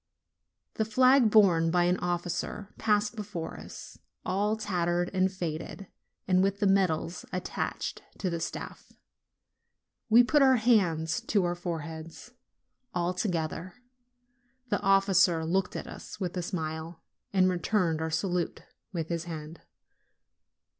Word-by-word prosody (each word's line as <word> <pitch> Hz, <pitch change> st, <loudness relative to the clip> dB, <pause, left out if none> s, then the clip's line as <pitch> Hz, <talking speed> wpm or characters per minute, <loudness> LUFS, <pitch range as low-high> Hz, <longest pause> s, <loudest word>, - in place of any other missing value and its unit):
The 220 Hz, -, +2 dB
flag, 255 Hz, +2 st, +5 dB
borne 180 Hz, -6 st, +5 dB
by 175 Hz, +1 st, +3 dB
an 180 Hz, +1 st, +2 dB
officer, 175 Hz, +3 st, -3 dB
passed 210 Hz, 0 st, +1 dB
before 205 Hz, -6 st, -5 dB
us, -, -, -10 dB, 0.3 s
all 205 Hz, +4 st, 0 dB
tattered 175 Hz, -4 st, -1 dB
and 190 Hz, 0 st, +2 dB
faded, 175 Hz, +1 st, -5 dB, 0.4 s
and 185 Hz, -1 st, +4 dB
with 195 Hz, +1 st, +1 dB
the -, -, +1 dB
medals 185 Hz, -3 st, +1 dB
attached 180 Hz, -1 st, -3 dB, 0.2 s
to 185 Hz, -, -2 dB
the 170 Hz, -, -2 dB
staff. 165 Hz, -, -6 dB, 1.2 s
We 235 Hz, +2 st, +8 dB
put 295 Hz, +4 st, +3 dB
our 265 Hz, -1 st, +6 dB
hands 180 Hz, -9 st, +2 dB
to 205 Hz, -3 st, +2 dB
our 175 Hz, -, 0 dB
foreheads, 165 Hz, +3 st, -6 dB, 0.6 s
all 175 Hz, 0 st, 0 dB
together. 175 Hz, -2 st, -3 dB, 0.9 s
The 205 Hz, -, 0 dB
officer 195 Hz, -4 st, +4 dB
looked 180 Hz, +3 st, 0 dB
at -, -, -4 dB
us -, -, -10 dB
with 180 Hz, -3 st, -3 dB
a 180 Hz, -, -1 dB
smile, 160 Hz, -2 st, -5 dB, 0.3 s
and 185 Hz, -2 st, +4 dB
returned 180 Hz, -2 st, +1 dB
our 160 Hz, -, -1 dB
salute 175 Hz, +1 st, -1 dB, 0.3 s
with 165 Hz, -4 st, -4 dB
his 170 Hz, -1 st, -2 dB
hand. 160 Hz, -1 st, -7 dB
180 Hz, 130 wpm, -29 LUFS, 165-200 Hz, 1.2 s, We